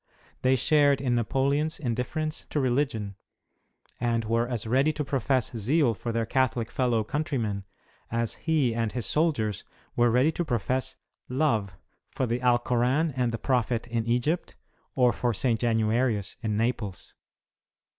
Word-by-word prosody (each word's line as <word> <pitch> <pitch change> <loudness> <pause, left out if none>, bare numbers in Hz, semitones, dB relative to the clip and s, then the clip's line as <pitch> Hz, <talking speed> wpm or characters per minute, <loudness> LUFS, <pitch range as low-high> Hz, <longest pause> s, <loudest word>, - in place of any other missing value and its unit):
They 130 +1 +4
shared 145 0 +3
in 130 -2 0
Napoleon's 140 +6 +1
indifference 150 +5 -3
to 150 - -1
religion, 120 -7 -1 0.8
and 115 -1 0
were 115 +2 +1
as 120 -3 -3
ready 135 +7 +3
to 150 -1 -3
profess 130 -2 0
zeal 125 +4 +2
for 115 +2 -4
their 115 0 0
Catholic 120 -2 0
fellow 120 -4 +1
countrymen, 115 -7 -2 0.5
as 115 -1 -1
he 150 -8 +1
and 115 -2 -1
his 120 -4 -1
soldiers 115 - 0 0.3
were 120 0 +4
ready 125 +7 +3
to 175 - -2
profess 130 -2 -1 0.2
" - - -49
love 105 - +1 0.2
" - - -48
for 130 - 0
the 120 0 -1
Alkoran 125 +5 +2
and 125 -2 +1
the 115 - -2
Prophet 120 -1 0
in 115 -1 -2
Egypt, 125 +9 0 0.4
or 125 -4 +4
for 120 +1 -1
St. 115 0 +1
Januarius, 115 -2 +1
in 105 -2 -1
Naples. 110 -4 -2
120 Hz, 150 wpm, -27 LUFS, 115-135 Hz, 0.8 s, They